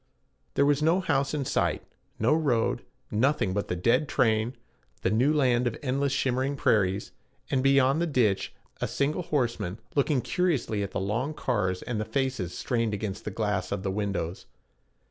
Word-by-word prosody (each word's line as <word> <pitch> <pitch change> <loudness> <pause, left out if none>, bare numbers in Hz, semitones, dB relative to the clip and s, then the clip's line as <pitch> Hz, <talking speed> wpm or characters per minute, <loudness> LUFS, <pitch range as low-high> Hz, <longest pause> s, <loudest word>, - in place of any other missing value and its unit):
There 140 - +4
was 145 0 +3
no 165 +4 +3
house 140 -7 +1
in 145 -3 -2
sight, - - 0 0.3
no 115 +7 +3
road, 125 -7 +1 0.3
nothing 115 -3 +2
but 100 +1 -1
the - - -2
dead 125 - +2
train, 115 0 +1 0.5
the 95 - +2
new 125 +7 +3
land 125 -5 +3
of 115 - -2
endless 140 +1 0
shimmering 135 +1 0
prairies, 100 -6 +1 0.4
and, 130 - +2
beyond 135 +2 +4
the 170 - +1
ditch, 120 -10 +1 0.3
a - - 0
single 150 +5 0
horseman 120 - -1 0.2
looking 140 -2 +2
curiously 145 - 0
at 100 - -2
the - - -3
long 115 +10 -1
cars 100 -10 -1
and 115 -3 -2
the - - -2
faces 125 -6 -2
strained 115 -4 0
against 100 -1 -5
the - - -1
glass 100 -4 -2
of 100 -1 -2
the 95 - -1
windows. 100 -4 -3
125 Hz, 170 wpm, -27 LUFS, 105-140 Hz, 0.5 s, There